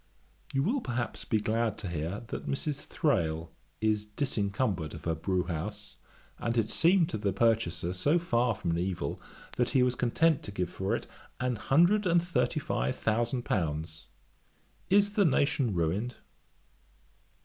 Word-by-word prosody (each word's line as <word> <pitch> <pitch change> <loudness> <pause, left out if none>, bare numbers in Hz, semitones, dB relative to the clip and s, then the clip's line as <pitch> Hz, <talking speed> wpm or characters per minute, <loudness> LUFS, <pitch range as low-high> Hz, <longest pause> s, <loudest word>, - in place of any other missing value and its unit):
'You 135 0 +1
will, 245 - +1
perhaps, 120 - -3
be 110 - +1
glad 110 0 0
to 100 - -4
hear, 85 +3 -3
that - - -5
Mrs. 145 +1 -1
Thrale 85 - -1 0.3
is 110 -1 +2
disencumbered 105 - -1
of - - -10
her 85 - +1
brewhouse; 90 +4 -3 0.4
and 115 0 -1
that - - +4
it 110 - 0
seemed 170 0 +5
to 110 - -3
the 100 -1 0
purchaser 95 -5 +1
so 145 - +2
far 125 -9 +1
from 85 -3 -2
an 85 - 0
evil, 90 -5 -3 0.4
that 125 - +2
he 125 - +5
was 125 -1 +2
content 140 +6 +2
to - - -7
give 90 -3 -2
for 95 0 -1
it - - -5 0.3
an 125 -1 0
hundred 175 - +3
and 170 0 +5
thirty 175 -2 0
five 130 - -1
thousand 120 +3 0
pounds. 80 -2 -2 0.8
Is 205 +1 +4
the 205 - +4
nation 135 - +2
ruined? 95 +9 -1
110 Hz, 160 wpm, -30 LUFS, 90-135 Hz, 0.8 s, seemed